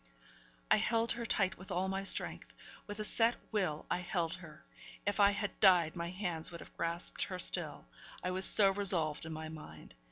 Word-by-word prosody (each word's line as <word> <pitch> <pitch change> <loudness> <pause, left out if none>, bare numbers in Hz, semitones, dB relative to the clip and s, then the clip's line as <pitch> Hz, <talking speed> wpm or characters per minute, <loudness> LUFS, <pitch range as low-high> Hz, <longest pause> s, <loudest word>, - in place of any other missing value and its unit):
I - - +7
held 230 0 +1
her 235 -1 -4
tight 195 -3 0
with 190 - -12
all 185 +1 -1
my 195 0 -3
strength; 195 - -1 0.3
with 205 0 -6
a 215 - -3
set 225 +2 +2 0.2
will, 185 -8 -1
I - - +1
held 175 -2 -2
her. 155 -4 -12 0.4
If 205 +1 -1
I 200 -1 +7
had 205 0 -4
died, 180 -5 +5
my 170 0 -4
hands 175 -4 -4
would 170 - -9
have - - -14
grasped 170 +1 0
her 185 -2 -6
still, 175 -4 0 0.4
I 180 - -1
was 190 +1 +4
so 200 -2 +6
resolved 175 -6 +1
in - - -7
my 155 0 -6
mind. 150 - -11
185 Hz, 195 wpm, -33 LUFS, 165-200 Hz, 0.4 s, I